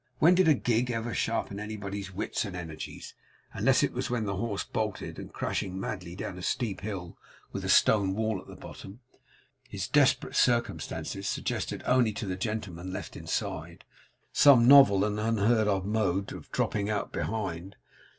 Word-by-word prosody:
When 170 +4 +6
did 185 -1 +4
a 155 - +6
gig 120 0 0
ever 115 0 -2
sharpen 110 -3 -1
anybody's 100 -2 -5
wits 95 - -2
and 100 -4 -6
energies, 80 -3 -7 0.4
unless 125 +6 +3
it - - 0
was 130 +1 -3
when 120 -3 -1
the 100 -2 -2
horse 100 0 -2
bolted, 110 -2 -4
and, - - -9
crashing 95 0 -3
madly 90 -3 -5
down 90 -1 -6
a - - -8
steep 105 0 -2
hill 95 -4 -6 0.3
with - - -5
a - - -3
stone 100 -3 +4
wall 110 -3 -1
at - - -18
the - - -10
bottom, 100 +6 -11 0.7
his 100 -4 -4
desperate 145 -2 +3
circumstances 115 -4 0
suggested - - -3
to - - -16
the - - -1
only 125 -4 +4
gentleman 95 -3 -4
left 95 - -6
inside, - - -4 0.5
some 125 -5 +7
novel 105 -8 +8
and 105 0 -2
unheard 110 0 +2
of 95 -2 0
mode 100 -2 0
of - - -11
dropping 100 0 -1
out 105 -1 -2
behind? 95 -3 -3
105 Hz, 170 wpm, -29 LUFS, 95-115 Hz, 0.7 s, novel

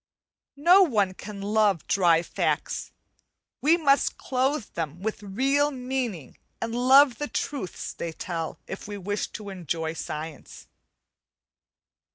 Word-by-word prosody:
No 345 +7 +6
one 210 - +2
can 200 +1 -8
love 205 -4 +2
dry 175 -3 +3
facts; - - -2 0.7
we 320 +4 +5
must 280 -4 +2
clothe 260 -1 0
them 165 0 -4
with 220 -1 -3
real 270 +9 +1
meaning 250 - -4 0.2
and 230 0 -3
love 260 +2 +5
the 295 - -2
truths 280 -12 -4
they 170 - -4
tell, 165 0 -4
if 190 - -7
we 205 -1 -5
wish 205 +2 -2
to 210 -2 -7
enjoy 165 -3 -3
science. 155 -1 -7
210 Hz, 125 wpm, -26 LUFS, 175-265 Hz, 0.7 s, No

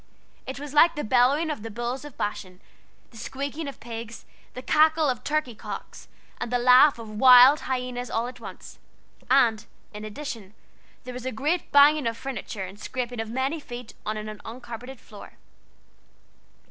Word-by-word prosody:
It 265 0 -6
was 290 0 -8
like 330 +3 +5
the 295 - -3
bellowing 260 +7 +3
of 290 - -5
the 225 - -6
bulls 240 +4 -4
of 295 -3 -11
Bashan, 185 -3 -4 0.5
the 230 - -14
squeaking 280 +6 -5
of 280 - -8
pigs, 230 0 -8 0.3
the 255 - -7
cackle 315 +1 +3
of 250 -4 -2
turkey 305 -5 -1
cocks, 215 - -9 0.3
and 240 - -4
the 245 - +2
laugh 250 +3 +6
of 230 -1 -9
wild 250 +6 +7
hyenas 250 -1 -4
all 230 +1 -1
at 245 0 -8
once; - - -11 0.5
and, 230 -4 +3 0.3
in 210 0 -8
addition, 215 -3 -7 0.5
there 250 -1 -8
was 250 +1 -6
a - - -2
great 300 +10 -2
banging 285 -1 +6
of 230 0 -2
furniture 225 -6 -6
and 190 +3 -11
scraping 245 0 -4
of 225 0 -3
many 265 +6 -1
feet 245 -4 -9
on 215 +1 -3
an 215 0 -7
uncarpeted 240 +2 -9
floor. 210 - -13
250 Hz, 170 wpm, -25 LUFS, 225-275 Hz, 0.5 s, wild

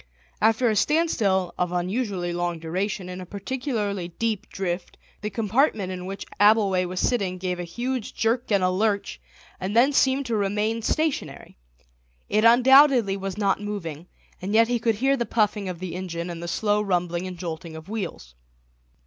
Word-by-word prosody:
After 225 +2 +3
a 220 - +2
standstill 205 - +1
of 180 -1 0
unusually 180 0 -2
long 175 -1 -1
duration 185 +4 -3
in 180 0 -6
a - - -7
particularly 205 - -3
deep 215 +3 -3
drift 180 -2 -4 0.2
the 210 - -2
compartment 215 -1 +1
in 180 0 -6
which 195 +1 -6
Abbleway 205 -3 +4
was 180 +1 -4
sitting 195 -7 0
gave 180 -1 -3
a - - -2
huge 240 +6 -4
jerk 230 +1 0
and 200 -2 +3
a 185 - +3
lurch, 200 +1 -1 0.4
and 190 +3 -3
then 265 +5 +5
seemed 270 0 +3
to 230 -2 -1
remain 210 +2 0
stationary; 310 +5 -2 0.7
it 215 +1 +2
undoubtedly 250 -2 +6
was 195 0 -5
not 200 -1 +1
moving, 175 -6 -5 0.3
and 195 +4 -2
yet 230 +1 +6
he 245 -1 +1
could 225 -1 +1
hear 270 +5 +2
the 240 - -1
puffing 210 -3 0
of 180 - -5
the 185 0 -6
engine 175 -1 -4
and 170 -1 -7
the 170 - -5
slow 210 +3 +1
rumbling 180 -2 -1
and 180 -1 -7
jolting 165 -1 -6
of 160 +1 -10
wheels. 185 - -5
200 Hz, 175 wpm, -25 LUFS, 180-225 Hz, 0.7 s, undoubtedly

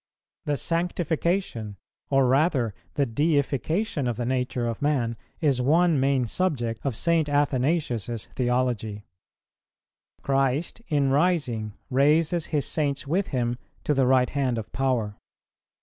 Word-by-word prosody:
The 145 -1 0
sanctification, 170 - -1 0.3
or 135 -1 +4
rather 130 - +2 0.2
the 140 - +2
deification 145 - 0
of 120 -2 -2
the 120 - -2
nature 125 -1 -1
of 115 -2 -3
man, 130 -6 +1 0.3
is 140 -5 +2
one 160 +3 +3
main 135 -1 +2
subject 120 - -1
of 135 -5 -1
St. 165 +3 +1
Athanasius's 135 - 0
theology. 120 -4 -1 1.2
Christ, 135 - 0
in 140 -3 +2
rising, 140 - +1 0.2
raises 155 +5 +3
His 150 -4 0
Saints 145 -3 -1
with 180 +7 0
Him 120 -2 -1 0.2
to 150 - +1
the 135 -2 +2
right 130 -1 +3
hand 135 -4 0
of 110 - -6
power. 125 -6 -1
135 Hz, 125 wpm, -25 LUFS, 120-155 Hz, 1.2 s, or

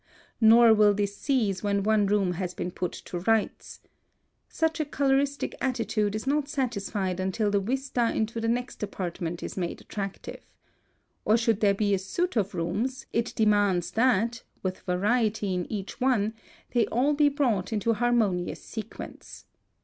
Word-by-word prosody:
(181) 220 -2 +6
Nor 230 0 +8
will 210 -1 +5
this 200 0 -1
cease 220 -10 0
when 200 -1 0
one 210 -1 +3
room 200 -2 +2
has 180 0 -4
been 180 - -3
put 180 0 -3
to 175 - -7
rights. 220 +3 -1 0.7
Such 320 0 0
a 310 - 0
coloristic 280 0 0
attitude 230 -5 0
is 215 - -4
not 285 +1 0
satisfied 200 - -2
until 190 +3 0
the 200 - +3
vista 245 +2 -1
into 225 +1 -2
the 225 - -1
next 245 +2 -2
apartment 175 -4 -4
is - - -5
made 175 -3 -3
attractive. 195 -2 -6 0.8
Or 220 - +4
should 230 -2 +1
there 200 -2 +3
be 205 0 +1
a 195 - +2
suite 345 - -2
of 205 -3 0
rooms, 205 +10 -2
it 230 +1 -1
demands 205 -5 +2
that, 230 -1 +2 0.2
with 185 -1 -2
variety 205 +2 0
in 180 -1 -3
each 210 +3 -5
one, 225 -5 +2 0.4
they 240 -2 +2
all 265 +6 +2
be 295 0 +4
brought 240 -10 0
into 220 +1 +1
harmonious 220 -6 0
sequence. 220 -1 -9
215 Hz, 160 wpm, -27 LUFS, 195-240 Hz, 0.8 s, Nor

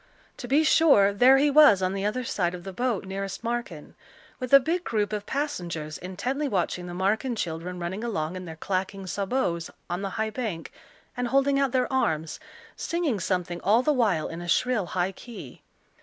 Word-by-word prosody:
To 245 - -7
be 285 +5 +3
sure, 280 -11 +5
there 255 +6 +6
he 290 +1 +3
was 280 -10 +7
on 185 +1 0
the 195 0 -2
other 250 +5 -1
side 180 -6 -1
of 175 - -10
the 195 - -7
boat 240 -2 -1
nearest 195 +2 -5
Marken, 230 -10 -4 0.5
with 255 -2 -5
a 275 - +10
big 335 +6 -1
group 215 -6 -1
of 210 -1 -4
passengers, 175 - -3
intently 245 +11 -3
watching 180 -5 -1
the 175 - -6
Marken 215 +7 0
children 175 -1 -4
running 185 +5 -4
along 175 -7 -2
in 185 0 -6
their 160 -2 -8
clacking 190 +3 -3
sabots, 190 -3 -1 0.2
on 175 +2 -2
the 200 - -2
high 220 0 -1
bank, 215 -9 -4 0.4
and 245 -1 -1
holding 275 +2 +2
out 275 -2 +1
their 255 0 0
arms, 160 -11 0 0.4
singing 330 - -1
something 175 -1 -2
all 220 +6 +3
the 300 - +3
while 210 - +1
in 165 +1 -7
a 175 - -7
shrill, 225 0 +1
high 180 +1 -1
key. 235 +4 -11
200 Hz, 190 wpm, -26 LUFS, 180-255 Hz, 0.5 s, a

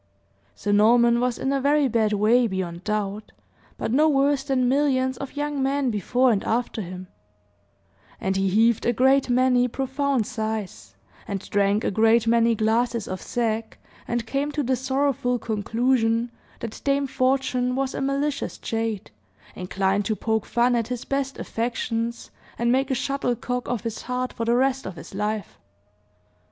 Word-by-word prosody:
Sir 205 - -2
Norman 235 +3 +5
was 250 -1 0
in 270 - -1
a 275 - 0
very 285 +1 +3
bad 220 -3 +1
way, 220 +4 +3
beyond 185 -3 -4
doubt, 210 0 -3 0.4
but - - -3
no 300 +5 +4
worse 280 -1 +2
than 265 -3 +1
millions 260 -1 +2
of 275 +2 -7
young 290 -1 -2
men 270 -1 +1
before 245 +5 +2
and 200 -3 0
after 230 -1 -1
him; 185 0 -7 1.1
and 190 0 -1
he 195 0 +1
heaved 225 +4 +3
a 240 - +3
great 265 +2 +3
many 250 0 +3
profound 265 -1 -1
sighs, 215 - -5 0.3
and 200 -2 -4
drank 205 +1 +2
a - - 0
great 225 +2 +4
many 230 0 +3
glasses 225 +1 0
of 185 - -5
sack, 225 -2 -2 0.3
and 235 -1 -2
came 280 +5 -1
to 295 0 -1
the 260 +1 +1
sorrowful 265 -1 0
conclusion 230 +1 0 0.3
that 230 -2 -6
Dame 280 0 +1
Fortune 255 -1 0
was 270 0 -1
a - - -3
malicious 275 +1 -1
jade, 225 -3 -3 0.4
inclined 195 +2 -1
to 215 - 0
poke 220 0 -1
fun 240 +1 +2
at 230 -2 0
his 250 -2 -5
best 275 0 -2
affections, 230 0 -3 0.3
and 235 0 +1
make 265 +2 +1
a 265 - +1
shuttlecock 250 -2 -2
of 245 -2 -2
his 230 -2 -4
heart 250 0 -3
for 230 - -3
the 235 +1 +2
rest 265 0 +1
of 190 - -7
his - - -11
life. 210 +1 -3
240 Hz, 165 wpm, -24 LUFS, 220-265 Hz, 1.1 s, Norman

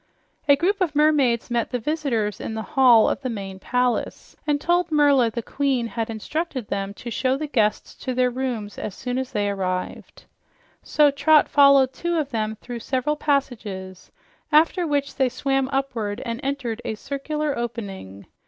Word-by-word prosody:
A 285 - +7
group 385 +7 0
of 340 -5 0
mermaids 280 -6 +2
met 235 -1 0
the 250 - -1
visitors 240 -7 -1
in 220 - -4
the 220 - -3
hall 250 -5 +6
of - - -1
the 260 - -3
main 195 -4 -6
palace 250 +4 -1
and 290 -1 +2
told 345 +2 +1
Merla 285 -5 +4
the 230 +1 -5
queen 270 -3 0
had 230 -1 -3
instructed 255 +2 -4
them 195 0 -2
to 235 - -8
show 260 +3 0
the 305 - -3
guests 220 -8 0
to 255 -2 -4
their 250 0 +2
rooms 240 -5 -4
as 205 - -5
soon 250 +1 -3
as 260 -1 -4
they 205 -1 0
arrived. 185 -2 -4 0.6
So 295 -1 +3
Trot 290 +2 +4
followed 275 -2 +5
two 345 +4 -2
of 290 -3 -2
them 220 -2 -2
through 240 +2 -8
several 260 +5 -1
passages, 220 -11 -3 0.4
after 330 +3 +4
which 285 -1 -1
they 265 -2 +3
swam 270 +1 -1
upward 245 -7 -2
and 230 -1 -3
entered 270 -5 -3
a 220 - -3
circular 285 +4 -3
opening. 200 - -6
255 Hz, 170 wpm, -23 LUFS, 220-285 Hz, 0.6 s, A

